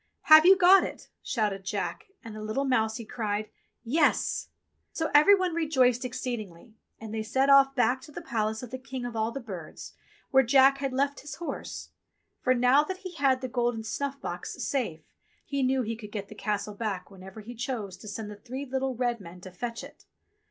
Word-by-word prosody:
*'Have 310 +1 +8
you 385 0 +8
got 375 +1 +7
it.?'* - - -7
shouted 205 -5 -1
Jack, 430 - -4 0.2
and 225 -2 -9
the 215 - -7
little 215 +6 -2
mousie 225 -3 0
cried: 215 -1 -3 0.3
"Yes!" 290 +6 +1 0.4
So 320 - -2
every 300 +8 +8
one 370 -3 -1
rejoiced 265 -7 +2
exceedingly, 235 -6 -5 0.3
and 220 -1 -8
they 220 - -2
set 265 +6 +2
off 275 0 +6
back 255 0 +2
to 300 - -13
the - - -7
palace 220 0 -2
of 245 - -8
the 260 - -5
King 260 -1 -6
of 240 -1 -5
all 220 +1 0
the 275 - -5
Birds, 190 -10 -9 0.4
where 265 - +6
Jack 270 +2 +5
had 275 -1 -2
left 280 +2 0
his 285 -1 -8
horse; 340 - -6 0.5
for 255 - +3
now 250 +4 +5
that 375 +4 -5
he 370 - -5
had 270 -5 +2
the 260 - -3
golden 240 -2 -1
snuff 275 +5 -3
box - - -5
safe 230 - -2 0.4
he 280 -1 -2
knew 260 0 +2
he 225 0 -3
could 210 -2 -10
get 200 -2 -5
the - - -9
Castle 210 -1 -3
back 200 -3 -4
whenever 190 +2 -11
he 230 +3 -9
chose 235 -6 -4
to 210 - -12
send 210 +1 -6
the - - -8
three 255 +6 -7
little 265 0 -2
red 240 -1 -1
men 180 -1 -11
to 185 - -10
fetch 230 +5 -5
it. - - -14
245 Hz, 200 wpm, -28 LUFS, 215-275 Hz, 0.5 s, Have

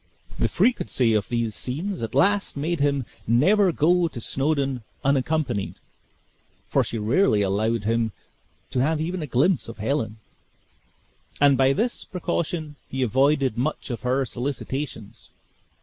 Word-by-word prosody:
The - - +3
frequency 130 - +2
of 105 -2 0
these 115 -2 -1
scenes 165 - -3
at 115 +3 -4
last 200 +4 +2
made 165 +3 -1
him 140 -2 +1 0.2
never 185 - +4
go 170 +3 +3
to 140 - -7
Snawdoun 135 0 -1 0.2
unaccompanied 140 -5 0 0.9
(for - - +2
she 115 - -4
rarely 110 - +3
allowed 110 +3 0
him 115 +1 +1 0.6
to 130 - 0
have 155 +3 +1
even 175 +3 -2
a 150 - -4
glimpse 140 +6 +2
of 115 - -8
Helen), 110 -1 -1 1.2
and 140 -1 +6
by 135 +1 +4
this 235 - -1
precaution 170 -4 -3
he 130 0 -1
avoided 135 0 +2
much 145 0 -2
of 115 - -4
her 130 +2 +1
solicitations. 130 -2 -5
135 Hz, 135 wpm, -24 LUFS, 115-155 Hz, 1.2 s, and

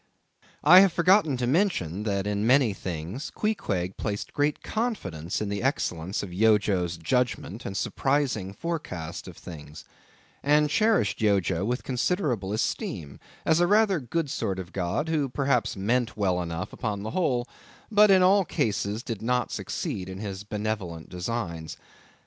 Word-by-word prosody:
I 175 +5 +9
have 195 -1 +6
forgotten 170 -4 +4
to 125 - -1
mention 125 - +1
that, 100 -2 0
in 105 0 -1
many 130 -4 +4
things, 90 - -5
Queequeg 95 - -2
placed 105 -1 -4
great 145 0 0
confidence 150 - -3
in 105 - -2
the 100 0 -2
excellence 95 - -1
of 90 -3 -7
Yojo's 95 -4 +2
judgment 120 +2 -1
and 95 - -4
surprising 135 -10 0
forecast 100 - -5
of - - -10
things; 75 -3 -10 0.6
and 150 +1 +3
cherished 215 - +2
Yojo 95 -4 +2
with 125 +3 -1
considerable 125 - -1
esteem, 80 -8 -3 0.3
as 160 0 +4
a 175 - +4
rather 205 -2 +4
good 150 +5 -2
sort 100 -4 -2
of 90 -1 -7
god, 95 - -1
who 150 -4 0
perhaps 135 -2 0
meant 115 +5 0
well 95 -3 +1
enough 85 +2 -4
upon 105 -3 -3
the 110 - -4
whole, 130 -8 0 0.4
but 210 0 +6
in 190 -1 +6
all 195 +2 +5
cases 105 - -1
did 115 -6 -5
not 125 +2 0
succeed 95 -1 -4
in 95 - -6
his 100 -1 -5
benevolent 105 -6 -4
designs. 90 -4 -4
110 Hz, 150 wpm, -27 LUFS, 95-145 Hz, 0.6 s, I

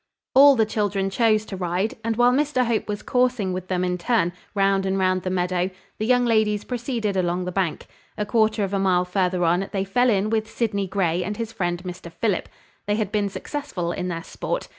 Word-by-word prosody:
All 275 +1 +8
the 225 -3 +3
children 200 -2 -1
chose 215 0 +2
to 200 - -6
ride; 185 +5 -1
and, 225 0 0
while 245 +2 +5
Mr 275 -1 +1
Hope 230 -2 0
was 210 -1 -4
coursing 250 -7 +1
with 185 0 -5
them 185 -1 0
in 180 0 -1
turn, 175 -3 +1 0.2
round 195 -1 +2
and 190 0 0
round 185 -1 +1
the 185 - -3
meadow, 180 0 0 0.3
the 215 - -1
young 245 0 +4
ladies 215 -3 +2
proceeded 235 -4 -2
along 180 -1 0
the 180 - -3
bank. 180 -4 -1 0.3
A 210 - -1
quarter 215 0 +2
of 195 0 -3
a 195 - +1
mile 180 -2 +2
further 180 -1 0
on, 175 +4 +1
they 195 -2 -1
fell 245 +6 +2
in 210 0 +1
with 220 0 0
Sydney 200 -4 -1
Grey 180 -2 0
and 205 +3 -4
his 230 -1 -4
friend 175 -2 -2
Mr 180 -2 -8
Philip. 200 +2 -1 0.4
They 205 - +2
had 210 -2 -2
been 205 -1 0
successful 195 - -4
in 180 +1 -3
their 165 -2 -4
sport. - - -4
200 Hz, 215 wpm, -23 LUFS, 180-225 Hz, 0.4 s, All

